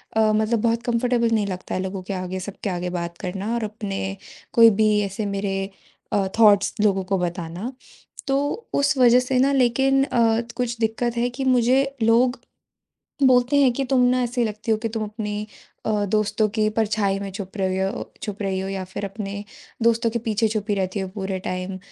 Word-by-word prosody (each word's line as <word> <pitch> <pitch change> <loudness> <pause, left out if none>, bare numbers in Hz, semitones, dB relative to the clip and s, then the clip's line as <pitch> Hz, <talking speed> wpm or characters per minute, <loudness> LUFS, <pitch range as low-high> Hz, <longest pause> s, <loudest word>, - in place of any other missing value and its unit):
अ, 220 -1 +4
मतलब 220 +1 +1
बहुत 230 0 +1
कम्फर्टेबल 240 0 +1
नहीं 210 -2 0
लगता 185 -2 -5
है 185 - -1
लोगों 190 0 -4
के - - -1
आगे 185 0 -4
सब 195 +2 -7
के 200 - 0
आगे 180 0 -2
बात 170 0 -5
करना 195 +4 -4
और 235 - -2
अपने 195 -2 -4 0.4
कोई 230 -1 +8
भी 215 - +5 0.2
ऐसे 195 +2 -4
मेरे 195 -1 -2 0.4
अ, 195 -2 +2
थॉट्स 205 -3 +5
लोगों 195 -3 +2
को 195 +1 0
बताना। 175 +5 -4 0.6
तो 270 - +2 0.4
उस 280 +1 +2
वज़ह 250 -1 +6
से 250 0 -1
ना 275 +2 +4
लेकिन 270 +2 +3
अ, 230 -4 +2 0.2
कुछ 240 -2 -1
दिक्क़त 230 +1 0
है 240 +1 +1
कि 250 +2 -5
मुझे 255 +1 +4 0.2
लोग 240 +3 +3 0.9
बोलते 250 +2 +4
हैं 275 -3 +5
कि 275 - -1
तुम 255 -2 +4
ना 255 0 +2
ऐसी 240 0 0
लगती 215 +1 -3
हो 220 - +3
कि 225 +1 -3
तुम 220 0 -3
अपनी 210 0 -4 0.4
अ, 210 -2 +1
दोस्तों 215 +1 +1
की 215 0 +3
परछाई 205 -3 +1
में 200 -1 -5
छुप 195 +1 -7
रहे 190 -1 0
हो 195 - -4
छुप 210 0 -5
रही 190 -1 -1
हो 190 - -3
या 195 -1 -3
फिर 185 +2 -5
अपने 200 0 -5 0.4
दोस्तों 230 0 +3
के 235 - -1
पीछे 225 -1 0
छुपी 210 -1 -1
रहती 190 +1 -2
हो 190 - -2
पूरे 190 -1 -3
टाइम। 185 +1 -4
215 Hz, 195 wpm, -23 LUFS, 195-235 Hz, 0.9 s, कोई